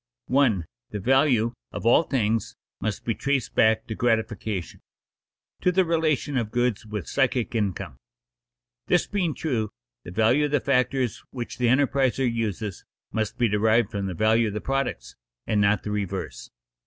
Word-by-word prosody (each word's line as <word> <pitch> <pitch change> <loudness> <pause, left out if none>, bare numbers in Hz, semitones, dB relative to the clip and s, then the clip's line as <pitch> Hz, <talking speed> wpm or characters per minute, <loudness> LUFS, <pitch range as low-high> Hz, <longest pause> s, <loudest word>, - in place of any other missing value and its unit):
_ 125 -9 +3 0.3
The 105 - -4
value 125 0 +3 0.2
of - - -6
all 120 - +6
things 115 -8 -1 0.2
must 105 -1 -3
be 115 - +1
traced 140 +1 -1
back 110 0 +3
to 110 - -5
gratification, 110 -5 -1 0.8
to 180 - +3
the 185 0 +3
relation 155 -4 0
of 115 -4 -1
goods 120 -2 0
with 105 -5 -5
psychic 130 -4 0
income. 100 - -2 0.9
This - - +3
being 180 -7 -1
true, 115 -9 -1 0.3
the - - -9
value 115 +10 +3
of 145 - -3
the 145 - +4
factors 130 -2 0
which 120 -1 -6
the 125 - +2
enterpriser 135 0 +2
uses 110 -4 -2 0.3
must 110 +1 -2
be 120 -2 +3
derived 110 +2 +2
from 100 -2 -2
the 90 - -4
value 110 +4 +3
of 105 - -4
the - - -1
products, 125 - -2 0.3
and 105 -1 +1
not 100 +1 +2
the 105 - -4
reverse. 105 -3 -4
115 Hz, 160 wpm, -25 LUFS, 105-135 Hz, 0.9 s, all